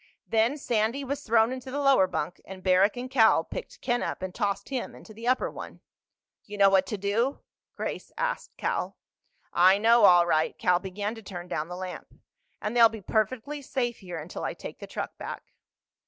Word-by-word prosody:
Then 230 +6 +2
Sandy 235 0 0
was 280 +2 -3
thrown 225 -1 +3
into 260 0 -6
the 280 +2 -3
lower 275 -9 +5
bunk, 175 -1 -4
and 185 -1 -10
Barrack 190 +4 +4
and 250 +1 -4
Cal 240 -4 +4
picked - - -8
Ken 240 -1 0
up - - -4
and 185 -1 -4
tossed 200 -1 -2
him 265 -3 -4
into 215 - -13
the 230 +3 -7
upper 255 +1 +2
one. - - -9 0.6
"You 205 0 -9
know 195 -1 +6
what 190 -1 +4
to 210 - -3
do?" 215 +8 0 0.3
Grace - - -5
asked - - -3
Cal. - - -2 0.6
"I 185 +2 +6
know, 230 +2 +5
all 175 -2 +7
right." 155 -2 +1
Cal 180 -1 +3
began 200 +3 -4
to 225 - -10
turn 180 -4 -8
down 150 0 -3
the 180 - -7
lamp. 185 -1 -7 0.4
"And 210 +3 -3
they'll 230 -1 +8
be 220 0 -8
perfectly 230 +8 -1
safe 245 -3 -2
here 180 -4 -7
until 160 +3 -7
I - - -3
take - - -9
the - - -8
truck - - -6
back." - - -8
215 Hz, 200 wpm, -27 LUFS, 185-245 Hz, 0.6 s, they'll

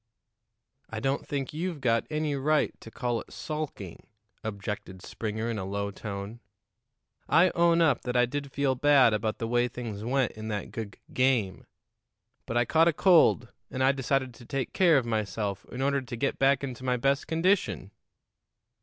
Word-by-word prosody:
"I 110 - -4
don't 135 +5 -1
think 140 -2 -3
you've 170 0 -3
got 115 -3 +1
any 150 -1 -1
right 150 +2 +1
to - - -10
call 120 0 -2
it - - -15
sulking," 150 - -6 0.4
objected 100 -3 -5
Springer 110 +1 -4
in 115 -2 -2
a - - -3
low 100 +1 -3
tone. 100 +2 -6 0.9
"I 175 +3 +5
own 170 0 +3
up 150 -7 +3
that 125 0 -2
I 125 - +5
did 140 +2 -5
feel 140 -1 +1
bad 135 -3 +5
about 110 +1 -1
the 115 - -3
way 120 +1 +2
things 115 -4 -6
went 130 +1 +1
in 110 0 -8
that 105 -2 -4
gug 110 -3 -6 0.2
game; 125 -7 +1 0.8
but 115 - -1
I 120 - +3
caught 165 +4 +4
a 170 - +3
cold, 160 -9 +4 0.2
and 130 - -2
I 135 - +5
decided 135 -1 -1
to 120 - -14
take 135 -2 -3
care 170 -5 +5
of 130 - +1
myself 105 -3 -2
in 130 +2 -3
order 140 0 +1
to 120 -2 -7
get 135 +4 -1
back 135 0 +3
into 130 -2 -5
my 125 -1 +1
best 135 +3 +1
condition." 165 - +1
125 Hz, 180 wpm, -28 LUFS, 110-140 Hz, 0.9 s, I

